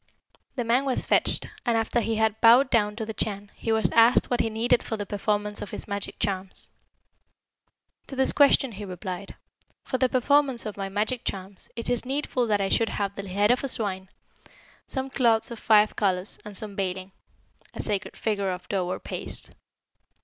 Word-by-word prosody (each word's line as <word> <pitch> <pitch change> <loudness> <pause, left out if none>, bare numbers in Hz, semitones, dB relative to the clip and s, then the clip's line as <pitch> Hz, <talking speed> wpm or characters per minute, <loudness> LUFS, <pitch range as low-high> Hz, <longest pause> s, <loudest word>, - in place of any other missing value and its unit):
"The 250 - -1
man 235 +4 +2
was 260 -2 0
fetched, - - +2 0.2
and 235 -3 +1
after 225 +2 +1
he 225 -1 -1
had 220 0 0
bowed 245 +4 +6
down 210 -3 +2
to 220 0 -4
the 220 - -5
Chan, 205 -1 -4
he 225 - -3
was 220 0 +2
asked 230 +2 +5
what 245 - +1
he 225 - +1
needed 230 +2 +2
for 220 - -4
the 205 - -4
performance 210 +1 -1
of 205 - -6
his - - -6
magic 200 -1 -5
charms. 190 -2 -2 1.4
To 270 - -7
this 265 0 +4
question 280 -3 +4
he 205 0 -8
replied, 185 0 -6 0.5
'For 260 - -2
the 255 - +3
performance 265 -1 +2
of 215 - -5
my 195 -1 -4
magic 215 +5 -1
charms, 190 0 -6
it 230 - -4
is 245 -2 0
needful 260 -2 -1
that 210 -2 +2
I 195 - 0
should 230 +2 +2
have 200 -1 -3
the 200 -1 -6
head 205 +4 +3
of 250 - +1
a - - 0
swine, 190 -6 -1 0.8
some 265 -1 -4
cloths 230 -3 +2
of 235 - -7
five 215 -1 +4
colours, 190 -1 0
and 210 -2 -3
some 210 -2 +2
baling' 190 -1 -3 0.6
(a - - -3
sacred 205 -2 -3
figure 200 -3 -1
of 180 0 -5
dough 190 -3 -1
or 180 - -3
paste). - - -5
215 Hz, 195 wpm, -26 LUFS, 200-240 Hz, 1.4 s, bowed